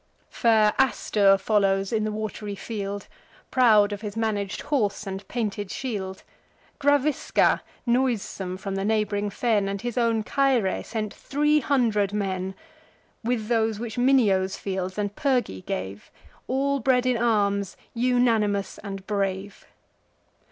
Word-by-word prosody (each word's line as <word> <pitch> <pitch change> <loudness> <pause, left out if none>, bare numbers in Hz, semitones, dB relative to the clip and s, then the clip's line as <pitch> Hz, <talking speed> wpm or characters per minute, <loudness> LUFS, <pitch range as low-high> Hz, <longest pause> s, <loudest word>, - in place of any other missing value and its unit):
Fair 220 -3 +3
Astur 205 -6 +3
follows 195 -1 +1
in 215 -1 +1
the 215 - -1
wat'ry 210 -1 -4
field, 200 -1 -5 0.4
Proud 215 -5 +5
of 205 - -6
his 210 -2 -6
manag'd 210 -3 -1
horse 215 -8 -1
and 195 0 -6
painted 205 -4 -3
shield. 195 -7 -4 0.6
Gravisca, 285 0 +2 0.2
noisome 235 -7 0
from 195 0 -5
the 195 0 -2
neighb'ring 210 -1 0
fen, 210 -2 +1
And 200 0 -3
his 240 0 -2
own 230 -2 +2
Caere, 260 -7 +1
sent 215 -2 -4
three 295 +2 +1
hundred 225 -9 +1
men; 190 -2 -2 0.7
With 225 -2 -1
those 220 -2 +1
which 230 -1 -5
Minio's 210 -8 +3
fields 185 -1 -4
and 205 -1 -2
Pyrgi 250 - 0
gave, 95 +2 -5 0.4
All 275 +2 0
bred 255 -1 +2
in 250 -1 +2
arms, 200 -4 +1 0.2
unanimous, 230 -5 +1
and 195 -2 -7
brave. 195 -1 -3
210 Hz, 130 wpm, -25 LUFS, 195-240 Hz, 0.7 s, Proud